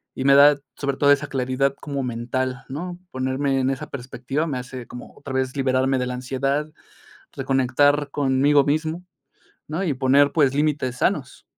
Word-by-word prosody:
y 130 - -3
me 140 0 +6
da, 145 +1 +7 0.2
sobre 140 -1 -2
todo 145 0 +4
esa 145 +1 +2
claridad 135 +1 0
como 140 -2 -4
mental, 125 +2 -3
¿no? 175 +6 -6
Ponerme 130 +1 -1
en 130 0 +1
esa 150 +3 -4
perspectiva 135 +4 -4
me 135 -4 -2
hace 125 -1 -7
como 125 - -11
otra 135 - -8
vez 130 -1 -1
liberarme 130 0 +1
de 125 0 -1
la 125 - -3
ansiedad, 135 +4 -2 0.6
reconectar 135 +2 +2
conmigo 140 +1 +3
mismo, 155 +4 -1 0.6
¿no? 160 +6 -3
Y 160 - 0
poner, 140 +2 +4
pues, 140 -5 +3
límites 145 -4 0
sanos. - - -1
135 Hz, 165 wpm, -23 LUFS, 130-145 Hz, 0.6 s, da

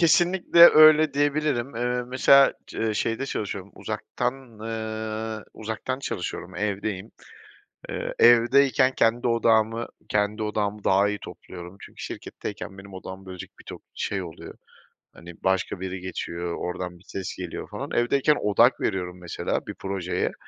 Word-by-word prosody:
Kesinlikle 175 +1 +3
öyle 155 -1 +7
diyebilirim. 145 -4 0
Iıı, 125 0 -1
mesela, 135 +2 +5
cı 110 -1 -2
şeyde 115 +5 -1
çalışıyorum, 100 -4 -4
uzaktan, 125 +1 -3 0.3
ııı, 110 0 -4
uzaktan 110 +4 -4
çalışıyorum, 90 -6 -5
evdeyim. 100 0 -3 0.8
Iıı, - - -4
evdeyken 130 +2 +5
kendi 120 +2 +2
odağımı 115 0 +2 0.2
kendi 105 +1 0
odağımı 105 -1 -2
daha 100 +2 +3
iyi 105 - -3
topluyorum. 90 +1 -10
Çünkü - - -12
şirketteyken 95 - -7
benim 95 0 -12
odağımı 95 +1 -9
bölecek 95 -1 -9
bir - - -14
tok - - -9
şey 95 -2 -2
oluyor, 80 -3 -9 0.6
hani, 85 0 -12
başka 95 -1 0
biri 95 0 -4
geçiyor, 85 -1 -4
oradan 90 0 -5
bir 90 - -23
ses 95 -1 -5
geliyor, 90 -2 -6
falan. - - -6
Evdeyken 140 +5 +2
odak 115 +5 +4
veriyorum, 90 -3 -2
mesela, 85 - -3
bir - - -6
projeye, 95 -2 -2
110 Hz, 135 wpm, -25 LUFS, 95-120 Hz, 0.8 s, öyle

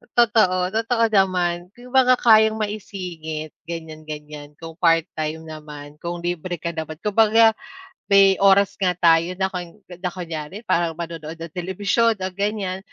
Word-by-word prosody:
Totoo 200 -6 +2
totoo 230 +1 +1
naman, 180 -3 +1
'yong 245 +1 -14
mga 255 -1 +5
kayang 220 -1 +6
maisingit, 180 -7 -5 0.2
ganyan-ganyan 155 -2 -8
kung 165 0 -9
part-time 160 -2 0
naman, 150 -1 -10
kung 170 0 -5
libre 175 0 -3
ka 170 +2 -4
naman. 160 -1 -6
Kumbaga 225 +2 +5 0.6
may 195 -1 +5
oras 195 0 +4
nga 180 -2 +1
tayo 170 +1 +3
na 190 0 -1
kun 175 -2 -6 0.2
na 180 - -2
kunyari 170 +2 -6
parang 170 -6 0
manonood 165 -2 -6
ng 165 -1 -9
telebisyon 200 +6 0
o 185 -2 -4
gan'yan, 200 -1 -2
180 Hz, 140 wpm, -22 LUFS, 165-200 Hz, 0.6 s, kayang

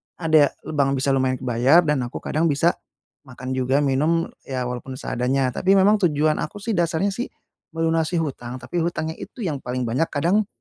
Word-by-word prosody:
ada 155 -3 +4 0.2
lebang, 140 -3 0
bisa 135 +1 0
lumayan 130 -1 +1
kebayar 130 +6 +3
dan 150 -4 +1
aku 120 - -8
kadang 160 +2 +1
bisa 160 +3 +3 0.6
makan 130 0 -7
juga 130 +2 +1
minum, 150 +5 +1 0.2
ya 130 -2 -2
walaupun 125 +1 -5
seadanya. 130 +1 -1
Tapi 190 +9 +2
memang 205 +2 +5
tujuan 150 0 +1
aku 155 - -4
sih 230 - -1
dasarnya 175 +1 +1
sih 240 +5 -4 0.5
melunasi 165 +1 0
hutang, 125 -4 -5
tapi 175 +6 -3
hutangnya 160 -1 -2
itu 235 - -8
yang 150 -6 -2
paling 125 0 -3
banyak 125 +8 0
kadang 180 +8 +1
150 Hz, 175 wpm, -23 LUFS, 130-165 Hz, 0.6 s, memang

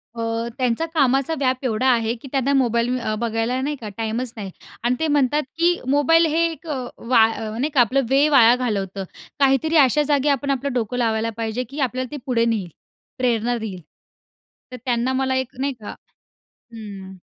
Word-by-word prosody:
अ, 230 0 -2
त्यांचा 255 +4 0
कामाचा 275 0 +2
व्याप 260 -2 +1
एवढा 250 +2 0
आहे 230 -2 +2
की - - -9
त्यांना 275 0 +1
मोबाईल 245 -1 +1
अ, 215 -2 -2
बघायला 230 +2 -1
नाही 295 +2 -2
का 215 - -5
टाईमच 225 +2 -3
नाही 200 -3 -6 0.3
आणि 240 +1 +2
ते 320 - +1
म्हणतात, 290 0 +2
की 345 +1 +2
मोबाईल 290 +4 +4
हे 320 +1 +1
एक 325 - -12 0.3
वा 230 -1 +4
अ, - - -6 0.2
नाही 275 +6 0
का 260 - +5
आपलं 255 +4 +2
वेळ 280 +3 +4
वाया 240 -4 +7
घालवतं. 200 -6 -2 0.4
काहीतरी 275 +4 +2
अशा 290 +1 +4
जागी 290 -1 +2
आपण 280 0 0
आपलं 275 0 -2
डोकं 245 0 -2
लावायला 225 -1 0
पाहिजे 225 +2 -2
की 285 - -7
आपल्याला 255 -1 -2
ते 295 - -5
पुढे 240 -4 +1
नेईल, 215 -6 -1 0.5
प्रेरणा 240 -1 0
देईल. 205 -5 -6 0.9
तर 250 - -7
त्यांना 245 +1 0
मला 260 0 0
एक 260 -1 -3
नाही 275 0 -1
का 210 - -8 0.8
हं. 195 -4 -9
250 Hz, 180 wpm, -22 LUFS, 230-275 Hz, 0.9 s, वाया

